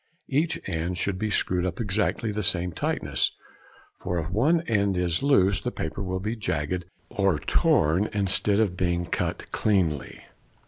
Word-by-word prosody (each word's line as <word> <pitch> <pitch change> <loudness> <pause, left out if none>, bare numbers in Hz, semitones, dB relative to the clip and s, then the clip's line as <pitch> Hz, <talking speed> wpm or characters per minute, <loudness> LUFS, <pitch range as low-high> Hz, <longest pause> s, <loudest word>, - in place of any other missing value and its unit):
Each 155 +4 +1
end 85 0 -2
should 95 0 -1
be 110 - -1
screwed 90 -3 +1
up 90 -2 -1
to - - -3
exactly 105 +2 0
the 105 +1 -2
same 90 -2 0
tightness, - - -1 0.7
for 90 - -2
if 80 +1 -3
one 150 - +3
end 100 - +1
is 90 -1 0
loose 100 -9 +3
the 125 - -2
paper 85 -4 -4
will 95 -1 -2
be 105 +4 -2
jagged 90 -4 -2 0.3
or 95 -5 +2
torn 80 +6 +2
instead 100 0 +1
of 100 -5 +1
being 85 -1 0
cut - - -3
cleanly. 90 -9 0
95 Hz, 165 wpm, -26 LUFS, 90-105 Hz, 0.7 s, one